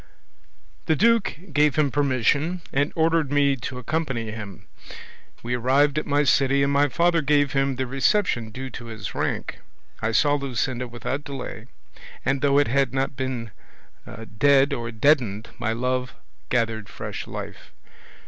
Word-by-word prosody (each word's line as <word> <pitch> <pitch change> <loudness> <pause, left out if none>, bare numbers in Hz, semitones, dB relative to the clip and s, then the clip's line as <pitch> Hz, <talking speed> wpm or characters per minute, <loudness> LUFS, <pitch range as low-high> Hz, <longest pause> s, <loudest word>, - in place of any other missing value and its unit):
"The 160 - +3
duke 230 -1 +2 0.2
gave 150 0 +3
him 150 -3 +2
permission, 145 +5 +1
and 145 +2 +1
ordered 160 -3 +2
me 140 -1 +3
to 125 +1 -6
accompany 125 -4 -2
him; 105 -3 -8 0.8
we 120 +1 -2
arrived 135 +5 +2
at - - -7
my 145 0 +2
city, 140 0 +3
and 140 0 +1
my 145 +1 +3
father 170 +2 +2
gave 145 -1 +2
him 135 -1 +1
the 130 +1 -2
reception 135 - +1
due 130 +4 -7
to 120 - -8
his 110 -4 -7
rank; - - -3 0.4
I 115 - 0
saw 145 +5 +3
Luscinda 125 -1 -2
without 130 +4 -4
delay, 135 -5 -7 0.6
and, 135 0 +1
though 140 -1 +3
it 145 - +4
had 135 0 +1
not 135 +1 -1
been 125 -4 -4 0.9
dead 140 0 +5
or 120 -3 -3
deadened, 115 -4 +1
my 110 - -1
love 125 +2 -2 0.3
gathered 115 -3 -1
fresh - - -6
life. - - -8
135 Hz, 150 wpm, -24 LUFS, 120-145 Hz, 0.9 s, dead